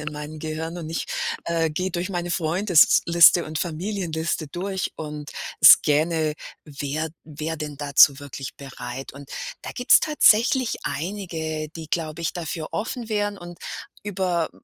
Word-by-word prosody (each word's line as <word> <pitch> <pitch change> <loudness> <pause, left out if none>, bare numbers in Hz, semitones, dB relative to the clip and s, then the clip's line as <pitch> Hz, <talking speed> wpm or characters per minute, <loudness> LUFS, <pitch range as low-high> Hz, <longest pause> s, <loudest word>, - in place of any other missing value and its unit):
in 150 0 -5
meinem 150 +1 -7
Gehirn 160 +2 -5
und 160 -2 -6
ich, 165 - -3 0.4
äh, 165 -2 0
gehe 185 +5 -2
durch 180 +2 -3
meine 175 -1 -3
Freundesliste 170 -1 +5
und 155 0 -4
Familienliste 170 -3 -2
durch 190 +3 -3
und 150 -2 -7 0.3
scanne, 155 +1 +6 0.3
wer 150 +2 -4 0.2
wer 155 +1 -5
denn 150 -2 -6
dazu 140 -1 +5
wirklich 140 -1 -7
bereit. 130 -1 -8
Und 140 0 -12 0.3
da - - -6
gibt's 245 - +5
tatsächlich 255 -4 +3
einige, 160 -1 -4
die 160 -1 -7
glaube 160 -1 -3
ich 165 - -2
dafür 165 -2 -4
offen 230 +2 -4
wären 205 -1 -1
und 175 -1 -10 0.4
über 185 -4 -1
160 Hz, 140 wpm, -24 LUFS, 150-180 Hz, 0.4 s, scanne